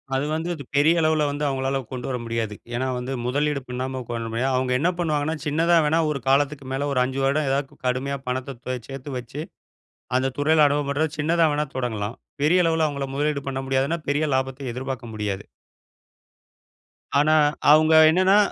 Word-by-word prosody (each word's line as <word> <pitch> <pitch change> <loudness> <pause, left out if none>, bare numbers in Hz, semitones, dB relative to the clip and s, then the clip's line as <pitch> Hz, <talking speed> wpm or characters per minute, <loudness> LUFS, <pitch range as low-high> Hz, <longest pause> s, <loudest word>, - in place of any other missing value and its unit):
அது 135 - 0
வந்து 165 +2 -3
அது 145 -4 -7
பெரிய 150 +4 +5
அளவுல 155 -1 +2
வந்து 145 +1 -3
அவங்களால 135 0 -1
கொண்டு 125 -2 -5
வர 125 - -1
முடியாது. 115 -2 -2 0.2
ஏன்னா 130 +2 -1
வந்து, 125 +2 -4
முதலீடு 145 +2 0
பண்ணாம 130 +1 -4
கோ 120 - -2 0.2
முடியாது. 130 +4 0
அவங்க 130 0 0
என்ன 170 +4 +2
பண்ணுவாங்கன்னா, 155 -2 0
சின்னதா 165 +3 +3
வேணா 160 +2 +2
ஒரு 145 - -2
காலத்துக்கு 140 0 +2
மேல 140 +2 -1
ஒரு 125 - +2
5 130 +1 -3
வருட 140 +3 +2
ஏதாது 135 0 -2
கடுமையா 135 +2 -1
பணத்த 130 0 -3
தோ 130 - -2
சேத்து 135 +1 -7
வச்சு, 135 +4 -6 0.8
அந்த 135 0 0
துறையில 155 +1 +4
அனுபவ 145 0 0
பெற்ற 145 +3 +1
சின்னதா 165 +2 +3
வேணா 150 +1 0
தொடங்கலாம். 115 -3 -3 0.3
பெரிய 180 +4 +4
அளவுல 160 -1 +2
அவங்கள 140 -2 -3
முதலீடு 145 -1 0
பண்ண 135 0 -3
முடியாதுன்னா, 135 +5 0
பெரிய 150 +2 +1
லாபத்த 130 -1 -2
எதிர்பாக்க 130 -1 -5
முடியாது. 105 -2 -3 1.8
ஆனா, 155 +2 +4 0.4
அவங்க 155 +1 +6 0.2
என்னன்னா 185 +4 +4
140 Hz, 170 wpm, -24 LUFS, 130-150 Hz, 1.8 s, அவங்க